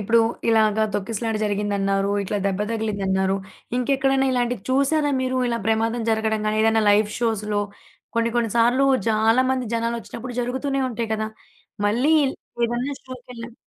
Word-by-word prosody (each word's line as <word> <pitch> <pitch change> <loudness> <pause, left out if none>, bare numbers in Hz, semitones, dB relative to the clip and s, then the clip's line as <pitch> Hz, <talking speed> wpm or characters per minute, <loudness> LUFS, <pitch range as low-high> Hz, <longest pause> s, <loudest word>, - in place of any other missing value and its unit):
ఇప్పుడు 230 +3 +3 0.3
ఇలాగ 220 -1 +3
తొక్కిసలాట 220 +2 -2
జరిగిందన్నారు, 200 -1 0
ఇట్లా 205 +2 -2
దెబ్బ 195 +1 -1
తగిలిందన్నారు. 195 -3 0 0.4
ఇంకెక్కడైనా 270 +1 +2
ఇలాంటివి 245 -4 -1
చూసారా 285 +2 +2
మీరు 260 0 -1
ఇలా 235 0 -1
ప్రమాదం 225 +1 +1
జరగడం 220 0 0
గాని 215 0 0
ఏదైనా 225 0 +3
లైవ్ 205 +1 +4
షోస్‌లో 215 -3 0 0.6
కొన్ని 230 0 +2
కొన్ని 235 -2 +1
సార్లు 245 +4 +4 0.2
చాలా 220 +3 +3
మంది 260 -1 0
జనాలొచ్చినప్పుడు 235 +1 -4
జరుగుతూనే 265 +3 -2
ఉంటాయి 230 -1 -3
కదా! 215 0 -2 0.6
మళ్ళీ 250 +9 +2
ఇల్ 265 - -1 0.3
ఏదన్నా 240 +4 -2
షోకెళ్లినప్ 245 -2 -9
230 Hz, 135 wpm, -23 LUFS, 215-250 Hz, 0.6 s, లైవ్